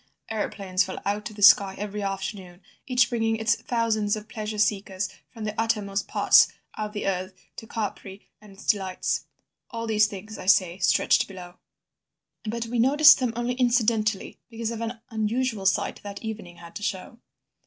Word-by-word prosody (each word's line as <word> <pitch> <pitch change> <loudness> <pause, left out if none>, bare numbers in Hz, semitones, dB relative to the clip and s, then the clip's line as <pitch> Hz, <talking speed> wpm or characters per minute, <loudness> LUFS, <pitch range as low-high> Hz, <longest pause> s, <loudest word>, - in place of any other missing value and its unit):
Aeroplanes 200 -3 -1
fell 190 0 -6
out 205 +1 -2
of 215 - -13
the 205 - -4
sky 195 -1 +7
every 210 +1 -4
afternoon, 195 -2 -5 0.2
each 250 -3 +3
bringing 225 -2 0
its 220 -1 +2
thousands 220 -3 0
of 215 0 -8
pleasure 215 -1 -5
seekers 200 -2 0 0.2
from 225 -3 -9
the 210 0 -3
uttermost 205 -3 -1
parts - - +6 0.3
of 210 -1 -5
the 205 - -4
earth 185 0 -2 0.2
to 225 - -9
Capri 200 -2 -5
and 210 -1 -15
its 195 - -14
delights. 190 -3 0 0.4
All 230 -1 -5
these 215 -1 +3
things, 210 +1 -9
I - - -8
say, 185 -2 +3
stretched 180 - +3
below. 180 -2 -11 0.9
"But 230 +2 -3
we 235 +1 -2
noticed 290 +6 +7
them 250 -3 0
only 240 +1 -1
incidentally 230 -4 +1
because 230 -1 -4
of 230 -1 -5
an 230 0 -4
unusual 220 -1 -1
sight 195 - 0
that 200 +1 -8
evening 210 -6 -6
had 170 -1 -13
to - - -10
show. 210 +5 -4
210 Hz, 170 wpm, -25 LUFS, 195-225 Hz, 0.9 s, sky